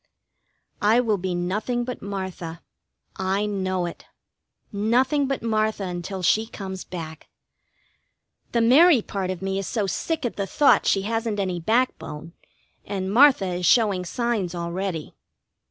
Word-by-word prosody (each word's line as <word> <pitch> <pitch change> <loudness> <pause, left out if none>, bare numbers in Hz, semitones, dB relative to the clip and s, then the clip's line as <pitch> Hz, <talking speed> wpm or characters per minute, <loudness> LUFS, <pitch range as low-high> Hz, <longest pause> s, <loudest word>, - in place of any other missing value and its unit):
I 215 +3 +4
will 220 -5 +1
be 180 0 -2
nothing 210 +8 -1
but 250 0 -6
Martha. 190 -4 -6 0.5
I 190 +2 0
know 185 -3 -1
it. 170 - -8 0.7
Nothing 250 +7 +2
but 275 -3 -3
Martha 215 -2 0
until 180 +1 -5
she 220 +6 +3
comes 190 -4 -7
back. 160 -3 -8 1.2
The 235 - +2
Mary 265 +2 +6
part 195 -2 -3
of 185 0 -4
me 195 0 -1
is 195 - -4
so 215 -4 -1
sick 305 - -2
at 240 - -3
the 200 -1 -2
thought 285 +8 +4
she 195 - +2
hasn't 225 0 -2
any 185 -3 -1
backbone, 170 -6 -1 0.5
and 195 -1 -3
Martha 260 -4 +6
is 180 -1 -1
showing 205 -5 +3
signs 205 -3 -2
already. 170 -1 -4
200 Hz, 140 wpm, -24 LUFS, 185-230 Hz, 1.2 s, Mary